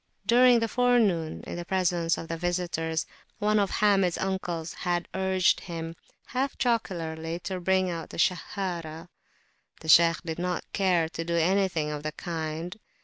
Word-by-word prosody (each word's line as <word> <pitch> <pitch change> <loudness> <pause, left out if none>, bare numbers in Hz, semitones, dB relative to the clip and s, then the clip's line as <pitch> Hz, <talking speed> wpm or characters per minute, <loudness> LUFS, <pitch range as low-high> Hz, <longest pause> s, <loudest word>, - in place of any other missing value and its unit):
During 245 0 +6
the 230 - +1
forenoon, 220 -9 +2
in - - -6
the 175 - -4
presence 175 -2 +1
of 165 - -6
the 165 - -3
visitors, 170 -2 -1 0.3
one 210 0 +2
of 200 -2 +1
Hamid's 195 -4 +2
uncles 175 -4 -3
had 175 -1 -2
urged 190 -1 +2
him, 165 -1 -6 0.3
half 265 +2 -1
jocularly, 165 -8 -1
to 185 0 -4
bring 185 +1 +2
out 165 -3 -4
the - - -9
Sahharah. 170 -3 -2 0.7
The 160 - -9
Shaykh 165 +1 +6
did 160 0 -4
not 180 -1 -2
care 180 -4 +2
to 165 - -4
do 170 0 -2
anything 170 -2 +1
of 150 -1 -4
the 155 0 -4
kind. 165 +3 -5
175 Hz, 155 wpm, -27 LUFS, 165-190 Hz, 0.7 s, During